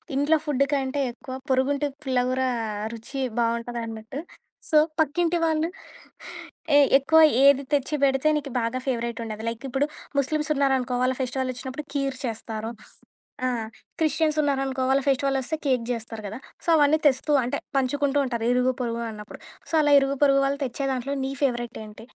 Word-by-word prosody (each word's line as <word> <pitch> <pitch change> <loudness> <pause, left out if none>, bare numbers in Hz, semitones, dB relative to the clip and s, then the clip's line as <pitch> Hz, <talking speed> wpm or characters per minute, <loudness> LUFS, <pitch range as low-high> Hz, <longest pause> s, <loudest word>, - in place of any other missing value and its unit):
ఇంట్లో 290 +3 +3
ఫుడు 275 -2 +2
కంటే 270 0 -1
ఎక్కువ 260 +2 -10 0.2
పొరుగుంటి 275 +2 +1 0.2
పుల్లగూర 255 -1 0 0.3
ఆ 210 0 -4
రుచి 235 +4 -6 0.2
బావుంటదన్నట్టు. 230 +1 -3 0.5
సో, 310 - +4 0.2
పక్కింటి 335 +3 +2
వాళ్ళు, 320 0 +1 1.1
ఏ - - +8 0.2
ఎక్కువ 320 +4 +4 0.2
ఏది 280 0 +6
తెచ్చి 290 +2 +1
పెడితే 270 +1 +3
నీకు 280 -2 -5
బాగా 230 +2 -1
ఫేవరైటుండేది. 230 -3 -3
లైకిప్పుడు 270 +4 -2 0.3
ముస్లిమ్సున్నరనుకో 275 -3 +1
వాళ్ళ 255 +1 +2
ఫెస్టివలొచ్చినప్పుడు 260 +2 -3
కీర్ 275 -2 -1
చేస్తారు. 225 -1 -4 0.8
ఆ! - - +2 0.5
క్రిస్టియన్సున్నారనుకో 290 -4 +1
వాళ్ళ 270 +1 +4
ఫెస్టివలొస్తే 270 +2 0
కేక్ 255 -4 +1
చేస్తారు 225 -2 -6
కదా! 215 +4 -7 0.3
సో, - - -13
అవన్నీ 300 +1 +4
తెస్తూ 270 +3 0
అంటే 245 - -2 0.2
పంచుకుంటూ 280 +2 +1
ఉంటారు. 235 -2 -2
ఇరుగు 250 +1 +2
పొరుగు 235 -1 -2
అన్నప్పుడు. 210 -1 -10 0.3
సో, - - -4
అలా 290 - +3
ఇరుగు 275 0 0
పొరుగు 275 -1 +4
వాళ్ళు 280 +1 -2
తెచ్చే 270 +2 -3
దాంట్లో 260 +2 -2
నీ 270 - -2
ఫేవరెటేంటి? 235 -4 -3
265 Hz, 140 wpm, -25 LUFS, 240-280 Hz, 1.1 s, ఏ